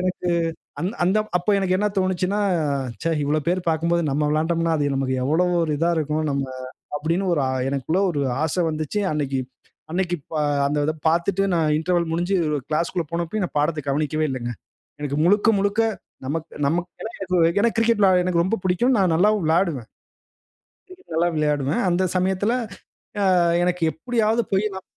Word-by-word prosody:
எனக்கு 180 -1 -2 0.5
அந் 175 - 0 0.2
அந்த 190 +4 +3 0.2
அப்போ 180 +4 0
எனக்கு 185 -1 +1
என்ன 210 +2 +1
தோனுச்சுன்னா, 185 +2 0 0.6
ச்சே! 165 - 0
இவ்ளோ 150 +2 +1
பேரு 180 +2 +1
பார்க்கும்போது 170 +2 +1
நம்ம 150 +2 0
விளையாண்டம்ன்னா, 165 +1 +1
அது 145 -2 0
நமக்கு 135 -1 0
எவ்வளவு 175 +6 +2
ஒரு 155 -2 0
இதா 170 +1 +2
இருக்கும். 155 0 -1
நம்ம 140 0 -1 0.5
அப்பிடின்னு 170 +6 -1
ஒரு 150 -5 +1 0.3
எனக்குள்ள 140 +6 0
ஒரு 145 - -2 0.2
ஆச 160 - 0 0.2
வந்துச்சு. 155 +6 -2
அன்னக்கி 140 -3 -1 0.5
அன்னக்கி 175 -1 0
ப - - -16 0.3
அந்த 145 +1 0
இத 155 - +1 0.2
பார்த்துட்டு 175 +4 +1
நான் 160 -2 +2
இன்டர்வல் 170 0 0
முடிஞ்சு 175 +4 0 0.3
கிளாஸ்குள்ள 165 +2 -1
போனப்பயும் 170 +4 -2
நான் 170 - -6
பாடத்த 150 +1 0
கவனிக்கவே 155 +2 0
இலலங்க. 120 -2 -3 0.5
எனக்கு 145 -1 -2
முழுக்க, 205 +4 +4
முழுக்க 200 +3 +1 0.4
நமக் 160 +4 -3 0.2
நமக்குலாம் 175 +7 -3
ஏதோ 185 0 0 0.2
ஏனா 235 - +3
கிரிக்கெட் 230 -1 +3
வெளையாட 185 -2 +5
எனக்கு 170 -2 +2
ரொம்ப 210 +5 0
பிடிக்கும். 235 +8 +2
நான் 185 -4 +3
நல்லாவும் 205 +2 +3
விளாடுவேன். 160 - +1 1.0
கிரிக்கெட் 370 - -12
நல்லா 175 +1 +3
விளையாடுவேன். 150 -1 0
அந்த 180 +2 +1
சமயத்தில 190 +4 +1 0.7
அ - - +2 0.4
எனக்கு 180 0 0
எப்பிடியாவது 230 +3 0
போய் 195 +2 +2
நான் 190 - -7
170 Hz, 160 wpm, -23 LUFS, 155-190 Hz, 1.0 s, வெளையாட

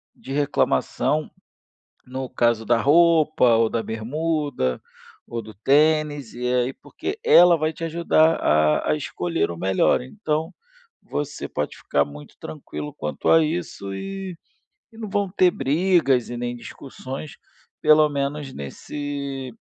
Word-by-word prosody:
de 135 - -11
reclamação, 145 +1 0 0.8
no 130 +1 -5
caso 120 -2 +1
da 120 - +4
roupa, 155 -4 +4
ou 115 0 +3
da 115 - -1
bermuda, 135 - -2 0.5
ou 115 - -4
do 110 -1 -11
tênis 145 +2 +2
e 125 +1 -2
aí 125 +1 +1
porque 385 - -6
ela 175 -1 +7
vai 155 +1 -1
te 165 - -7
ajudar 165 -1 +3
a 75 0 +2
a 150 - +2
escolher 165 - -2
o 85 - -8
melhor. 95 +6 +2
Então 160 - -3 0.5
você 145 -1 -4
pode 75 - -3
ficar 70 - 0
muito 75 +1 -12
tranquilo 150 0 -7
quanto 75 - -4
a 165 - +6
isso, 155 - -4
e 195 - -6 0.6
e 225 - -17
não 220 -3 -6
vão 200 -1 0
ter 180 -1 +3
brigas 140 -3 +2
e 120 - -5
nem 120 0 -3
discussões 135 +3 -8 0.5
pelo 155 0 +5
menos 140 0 -3
nesse 140 - -6
145 Hz, 135 wpm, -23 LUFS, 120-160 Hz, 0.8 s, ela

